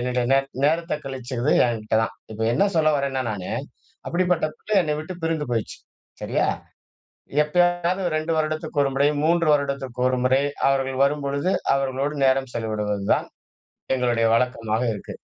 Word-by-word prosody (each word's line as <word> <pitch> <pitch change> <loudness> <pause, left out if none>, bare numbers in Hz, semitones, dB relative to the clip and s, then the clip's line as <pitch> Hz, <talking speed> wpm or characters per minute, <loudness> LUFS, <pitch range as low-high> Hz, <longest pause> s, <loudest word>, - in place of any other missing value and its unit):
என்னுடைய 125 0 0
நேர் 135 0 +3 0.2
நேரத்த 165 +3 +1
கழிச்சது 130 0 -3 0.2
என்கிட்ட 110 -2 -1
தான். - - -3 0.2
இப்ப 110 +1 -3
என்ன 200 +11 +3
சொல்ல 155 -1 +4
வரேன்னா 135 -1 -1
நானு, 95 -4 -5 0.6
அப்பிடிப்பட்ட 180 -2 +1
பிள்ளை 215 - -1
என்னை 150 -3 -1
விட்டு 160 +4 -7
பிரிந்து 160 -3 -1
போயிருச்சு. 115 -3 -2 0.4
சரியா? - - 0 1.0
எப்பையாவது 175 +3 +1
2 155 +1 -1
வருடத்திற்கு 155 -1 -1
ஒரு 140 - +1
முறை, 140 +2 +3 0.2
3 170 0 +3
வருடத்திற்கு 140 -3 -3
ஒரு 130 - 0
முறை 130 +2 +3 0.3
அவர்கள் 135 -1 0
வரும்பொழுது, 140 +3 0 0.2
அவர்களோடு 135 +2 -1
நேரம் 135 -1 +2
செலவிடுவது 105 -3 -2
தான் - - -3 0.7
எங்களுடைய 120 -2 +1
வழக்கமாக 115 -2 0
இருக்கு. 100 - -8
135 Hz, 140 wpm, -23 LUFS, 125-155 Hz, 1.0 s, சொல்ல